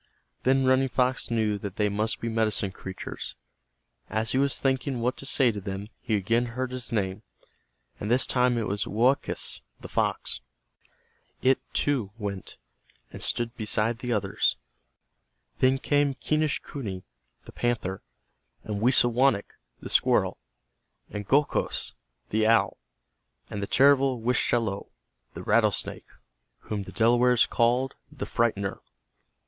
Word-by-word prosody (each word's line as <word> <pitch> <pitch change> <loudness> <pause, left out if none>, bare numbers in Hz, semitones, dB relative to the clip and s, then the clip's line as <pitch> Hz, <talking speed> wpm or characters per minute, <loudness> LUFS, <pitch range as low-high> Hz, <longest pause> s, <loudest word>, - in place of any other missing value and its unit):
Then 135 +1 +3
Running 130 +1 +3
Fox 125 0 0
knew 110 -3 0
that 100 -1 -6
they 105 -2 +2
must 105 +2 -1
be 115 - -2
medicine 110 -3 0
creatures. 95 0 -6 0.7
As 110 +1 0
he 130 - +2
was 140 0 +2
thinking 130 -1 0
what 125 +2 0
to 135 - -5
say 130 -3 +4
to 105 -2 -6
them, 100 +1 -5
he 115 -4 0
again 115 +5 +1
heard 130 0 -2
his 130 -1 -5
name, 100 -2 -1 0.8
and 105 - -4
this 125 +2 +4
time 125 -1 +2
it 115 - 0
was 100 0 -2
Woakus, 125 +6 +1 0.2
the - - -9
fox. - - -1 1.0
It, 130 0 +4
too, 135 -9 +1
went 100 -4 -5 0.6
and - - -8
stood 120 0 0
beside 110 +1 0
the 125 0 -3
others. 100 -3 +1 1.0
Then 130 +1 +4
came 145 0 +1
Quenischquney, 140 -10 -2 0.4
the - - -11
panther, 110 -6 -2 0.6
and 105 -1 -4
Wisawanik, 120 -2 +3 0.3
the - - -7
squirrel, - - +2 0.7
and 105 -1 -5
Gokhos, 145 +2 +1 0.4
the 110 0 +2
owl, 115 0 +3 0.7
and 100 - -4
the 100 - -2
terrible 135 -1 +4
Wischalowe, 115 -3 0 0.5
the - - -7
rattlesnake, 105 -7 +1 0.5
whom 105 -2 -4
the 95 - -8
Delawares 120 +1 +4
called 125 +3 +1 0.2
"The - - -5
Frightener." 100 -4 0
115 Hz, 130 wpm, -27 LUFS, 105-130 Hz, 1.0 s, say